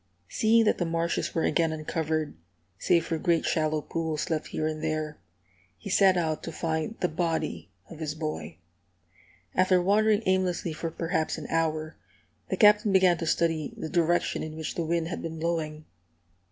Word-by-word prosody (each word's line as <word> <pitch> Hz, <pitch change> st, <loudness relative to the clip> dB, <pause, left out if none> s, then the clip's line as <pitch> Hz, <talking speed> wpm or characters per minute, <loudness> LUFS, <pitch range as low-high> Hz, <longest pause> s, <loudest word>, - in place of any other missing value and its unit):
Seeing 225 Hz, +1 st, +4 dB
that 215 Hz, -, +2 dB
the 175 Hz, -, +1 dB
marshes 165 Hz, 0 st, -1 dB
were 165 Hz, -, +1 dB
again 165 Hz, -2 st, +2 dB
uncovered, 155 Hz, 0 st, -2 dB, 0.5 s
save 170 Hz, -1 st, +2 dB
for 165 Hz, -1 st, -2 dB
great 170 Hz, 0 st, +1 dB
shallow 155 Hz, -1 st, +1 dB
pools 160 Hz, -1 st, -3 dB
left 155 Hz, -1 st, -1 dB
here 155 Hz, -, -3 dB
and 155 Hz, 0 st, -3 dB
there, 155 Hz, -1 st, -2 dB, 0.6 s
he 200 Hz, -, -7 dB
set 190 Hz, -1 st, +5 dB
out 160 Hz, -3 st, -1 dB
to 165 Hz, -, -6 dB
find 160 Hz, +5 st, -2 dB
the 180 Hz, -, +3 dB
body 160 Hz, -, -2 dB, 0.2 s
of 160 Hz, -, -11 dB
his 155 Hz, -1 st, -3 dB
boy. 155 Hz, -, -5 dB, 1.0 s
After 185 Hz, 0 st, +4 dB
wandering 210 Hz, +3 st, +3 dB
aimlessly 185 Hz, -3 st, 0 dB
for 165 Hz, +2 st, -4 dB
perhaps 165 Hz, 0 st, -1 dB
an -, -, -7 dB
hour, 160 Hz, -1 st, -1 dB, 0.5 s
the -, -, -1 dB
Captain 210 Hz, -1 st, +5 dB
began 185 Hz, -3 st, +4 dB
to 165 Hz, -, -3 dB
study 165 Hz, -2 st, 0 dB
the 160 Hz, -, -5 dB
direction 175 Hz, +1 st, +1 dB
in 155 Hz, 0 st, -6 dB
which 160 Hz, -1 st, -4 dB
the 170 Hz, -, -2 dB
wind 165 Hz, 0 st, 0 dB
had 175 Hz, -, -4 dB
been 160 Hz, 0 st, -5 dB
blowing. 155 Hz, -2 st, -2 dB
165 Hz, 170 wpm, -27 LUFS, 155-175 Hz, 1.0 s, set